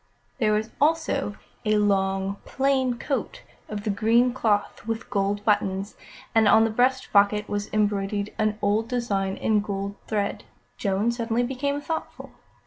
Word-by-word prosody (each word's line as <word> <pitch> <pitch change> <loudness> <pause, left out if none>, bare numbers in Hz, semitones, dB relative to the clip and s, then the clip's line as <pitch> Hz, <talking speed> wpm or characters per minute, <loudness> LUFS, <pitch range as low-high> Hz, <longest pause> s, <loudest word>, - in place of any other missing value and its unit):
There 215 -3 +3
was 215 +1 -1
also 295 -7 +1 0.3
a 215 0 +2
long, 195 -1 +1
plain 265 -2 +1
coat 275 +3 -3 0.3
of 210 -1 -5
the 210 - 0
green 230 +4 +3
cloth, 210 -3 0
with 225 0 -4
gold 200 +1 0
buttons, 200 -1 0 0.4
and 225 -1 +5
on 220 +2 +6
the 225 - +1
breast 255 +4 +1
pocket 205 +1 +4
was 205 0 -3
embroidered 205 -1 0
an 215 -1 +1
odd 210 +3 +2
design 200 -6 -1
in 215 -1 +2
gold 200 -1 -3
thread. 205 -2 -1 0.3
Joan 200 +3 0
suddenly 235 0 -1
became 280 +3 -2
thoughtful. 320 +2 -5
215 Hz, 145 wpm, -25 LUFS, 205-240 Hz, 0.4 s, on